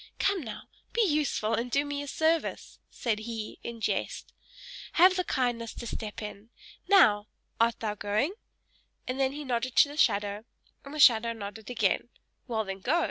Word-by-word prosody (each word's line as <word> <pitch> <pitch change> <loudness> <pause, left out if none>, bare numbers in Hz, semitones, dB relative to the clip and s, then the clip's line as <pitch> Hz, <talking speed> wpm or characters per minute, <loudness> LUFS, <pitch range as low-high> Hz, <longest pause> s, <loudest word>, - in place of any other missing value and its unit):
Come, 395 -2 +1
now! 225 -6 -7 0.3
Be 465 0 +3
useful, 295 - 0
and 240 +2 -1
do 280 +4 +1
me 285 0 -3
a 285 - -6
service," 320 +3 -1
said 225 -3 -2
he, 220 -1 -6
in 235 -1 -7
jest. - - -2 0.6
"Have 365 +2 +6
the 365 - +1
kindness 240 -6 -1
to - - -7
step 215 -1 -5
in. 210 +1 -8 0.4
Now! 215 - +5 0.3
Art 230 0 +2
thou 215 -2 -1
going?" 210 - 0 0.7
and 255 +1 -3
then 265 -1 +2
he 295 +1 -6
nodded 250 -1 -2
to 285 - +6
the 290 - -9
shadow, 205 -8 +2 0.4
and 280 +2 -9
the - - -5
shadow 230 -4 +6
nodded 210 0 -8
again. 230 -1 0 0.4
"Well 220 -3 -1
then, 195 0 -5
go! 295 - +1
235 Hz, 175 wpm, -29 LUFS, 215-290 Hz, 0.7 s, Have